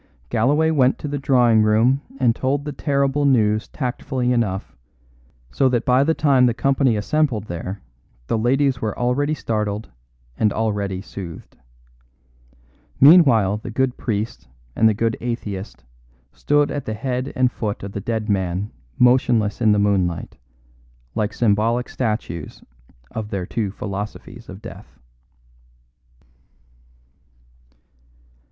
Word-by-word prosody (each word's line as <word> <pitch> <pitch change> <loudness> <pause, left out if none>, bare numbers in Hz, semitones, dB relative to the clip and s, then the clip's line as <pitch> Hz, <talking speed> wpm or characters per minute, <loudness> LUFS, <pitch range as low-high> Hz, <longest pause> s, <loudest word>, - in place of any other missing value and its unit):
Galloway 145 +8 +2
went 130 -4 +3
to - - -6
the 145 0 -3
drawing 125 -5 +4
room 115 +6 +3 0.2
and 120 -3 +3
told 140 +2 -1
the 150 - -3
terrible 140 0 0
news 110 -6 +2
tactfully 125 -1 -2
enough, 105 -5 -2 0.8
so 130 - +2
that 120 -2 0
by 130 +2 +4
the 160 +2 +1
time 135 -4 +4
the 120 - 0
company 135 -3 +2
assembled 125 0 0
there 90 +1 -6 0.4
the 115 - -1
ladies 130 +3 +1
were 110 -2 -3
already 140 +5 0
startled 105 - -3 0.5
and 105 - +3
already 100 -4 -2
soothed. 90 -5 -9 1.4
Meanwhile 135 - +6
the 110 - -8
good 125 +2 0
priest 110 -1 -4 0.3
and 110 - +4
the 110 - 0
good 115 +1 0
atheist 105 -5 -5 0.5
stood 145 0 +1
at 145 - -4
the 110 - -3
head 130 +3 -3
and 130 -1 +2
foot 105 -4 -4
of 100 - -6
the 100 - -5
dead 110 0 -3
man 95 -1 -1 0.3
motionless 120 -4 +3
in 110 -2 +4
the 105 - +3
moonlight, 95 -4 0 0.8
like 105 +6 -1
symbolic 115 +2 +1
statues 105 - -4 0.5
of 110 -2 -5
their 95 -3 -3
two 110 +1 -2
philosophies 105 +4 -7
of 95 +3 -10
death. - - -11
115 Hz, 130 wpm, -21 LUFS, 105-130 Hz, 1.4 s, Meanwhile